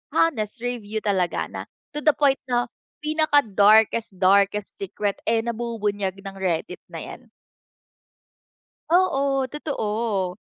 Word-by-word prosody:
honest 230 -8 +1
review 225 -3 -3
talaga 190 -4 0
na - - -5 0.3
to - - 0
the 305 0 +4
point 280 -2 +3
'no, 245 -1 +2 0.4
pinaka-darkest 225 -9 +3
darkest 200 +1 +3
secret, 200 +1 -2
eh, 225 0 +3
nabubunyag 210 -5 -2
ng 195 0 -7
Reddit 185 +1 -2
na - - -6
'yan. - - -11 1.6
Oo, 280 -7 +2
totoo! 215 - -2
220 Hz, 110 wpm, -24 LUFS, 200-270 Hz, 1.6 s, the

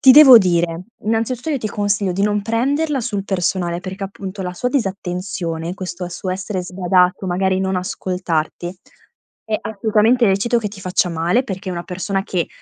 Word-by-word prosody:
Ti 265 -2 +9
devo 270 -5 +10
dire, 175 -2 0 0.2
innanzitutto 230 +6 -1
io 285 - 0
ti 215 - -3
consiglio 205 -2 0
di 195 - -1
non 210 0 +2
prenderla 275 +6 0
sul 205 -2 -2
personale, 180 -2 -1
perché, 190 +1 -6
appunto, 195 0 -7
la 180 0 -4
sua 250 +7 -1
disattenzione, 180 - -3
questo 180 -2 -5
suo 185 +2 -4
essere 190 0 -3
sbadato, 180 +1 +1
magari 190 +1 +1
non 190 -1 0
ascoltarti, 180 -1 -3 0.7
è 220 -1 0
assolutamente 220 +3 +2
lecito 230 +5 +2
che 210 - -2
ti 195 -2 -11
faccia 180 0 +1
male, 170 +8 +1
perché 190 -2 -5
è - - -3
una 170 - -3
persona 190 +2 -2
che, 180 -4 -1
190 Hz, 170 wpm, -19 LUFS, 180-215 Hz, 0.7 s, devo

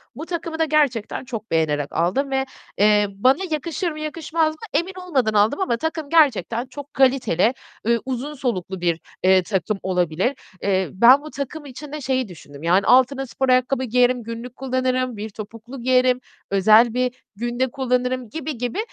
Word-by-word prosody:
Bu 315 - -6
takımı 335 -2 -4
da 320 - +3
gerçekten 275 -7 0
çok 225 -3 -7
beğenerek 150 -3 0
aldım 195 - 0
ve, 265 0 +1 0.3
eee, 210 0 +4
bana 255 +8 +3
yakışır 335 +4 -2
mı, 305 - -8
yakışmaz 315 +1 -1
mı 315 - -18 0.2
emin 360 +3 -5
olmadan 260 -10 +1
aldım 210 +6 +3
ama 240 -11 +1
takım 320 +1 -3
gerçekten 250 - +3
çok 285 +2 -10
kaliteli, 255 -5 +3 0.3
eee, 235 0 +3
uzun 265 +3 -4
soluklu 190 -9 -3
bir, 170 -2 +1 0.2
eee, 185 0 +5
takım 195 +2 -1
olabilir. 180 - 0 0.3
Eee, 190 -2 +1
ben 240 +8 +7
bu 305 - -9
takım 285 +2 -6
için 285 +2 -9
de 300 0 -5
şeyi 260 -2 0
düşündüm; 150 -5 -12
yani 175 +2 +4
altına 260 +2 +4
spor 265 +1 -2
ayakkabı 255 +1 +2
giyerim, 250 0 +2
günlük 230 +2 -7
kullanırım, 255 -2 -1
bir 215 +1 -5
topuklu 230 +5 -9
giyerim, 255 0 +3 0.3
özel 215 +4 +5
bir 250 0 0 0.2
günde 240 +3 -2
kullanırım 250 -2 -1
gibi 310 0 -5
gibi. 245 - -3
250 Hz, 170 wpm, -22 LUFS, 215-275 Hz, 0.3 s, ben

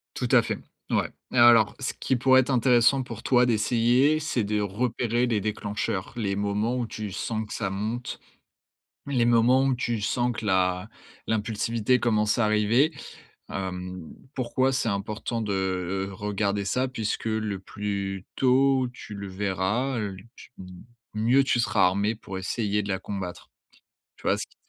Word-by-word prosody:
Tout - - -2
à - - +7
fait. - - -3 0.3
Ouais - - +1 0.2
et - - -1
alors 120 -3 +6
ce 135 - -1
qui 130 - +1
pourrait 130 +1 +5
être 130 - +1
intéressant 125 +1 +4
pour 115 -3 -8
toi 125 0 +4
d'essayer, 120 +6 +3
c'est 125 -8 -1
de 105 +1 0
repérer 120 +3 0
les 110 -4 0
déclencheurs. 105 -2 -3
Les 100 -4 -1
moments 105 +4 0
où 120 -2 -2
tu 105 -2 -6
sens 110 +3 -3
que 105 - -8
ça 100 -4 -2
monte, 110 +5 -4 0.9
les 130 -4 +1
moments 120 +3 +4
où 135 -1 +2
tu 120 -2 -2
sens 120 +4 0
que 110 -2 -6
la 90 -1 +1 0.4
l'impulsivité 110 +2 0
commence 110 -2 +1
à 120 - +3
arriver. 110 +9 +3 0.6
Hem, 90 -2 -5 0.2
pourquoi 130 +1 0
c'est 115 -3 0
important 105 +3 -3
de, 105 -2 -2
heu, 95 0 -2
regarder 100 0 -2
ça, 130 +5 +1
puisque 115 -5 -3
le 110 -3 -1
plus 100 -1 -4
tôt 130 0 +3
tu 110 -3 -10
le 100 0 -6
verras, 100 +7 -1
heu, 100 -3 -3 0.2
tu - - -14 0.6
mieux 120 +6 +4
tu 125 -2 +2
seras 110 -4 +3
armé 100 +4 +1
pour 95 -3 -8
essayer 105 +1 -1
de 100 - -6
la 95 - 0
combattre. 95 -2 -6 0.7
Tu - - -19
vois - - +1
ce - - -4
qui - - -29
110 Hz, 165 wpm, -26 LUFS, 100-120 Hz, 0.9 s, à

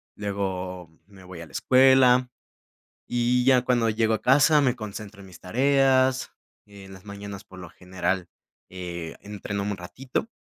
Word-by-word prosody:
luego 95 -3 -4 0.2
me 95 -2 -17
voy 90 -2 -10
a 85 - -8
la - - -19
escuela, 130 -1 +4 0.8
y 120 +1 +1
ya 130 -1 +4
cuando 120 -3 +1
llego 110 0 +1
a 110 - -2
casa 145 +3 +4
me 130 -3 +1
concentro 105 -2 -8
en 95 - -13
mis 90 -2 -14
tareas, 130 +4 +2 0.4
en 100 -1 -13
las 95 +1 -14
mañanas, 100 -1 -8
por 95 - -15
lo 90 -2 -10
general, 90 0 -3 0.4
eh, 85 -3 -7
entreno 100 0 -5
un 100 0 -3
ratito, 125 - -5
105 Hz, 155 wpm, -25 LUFS, 95-125 Hz, 0.8 s, escuela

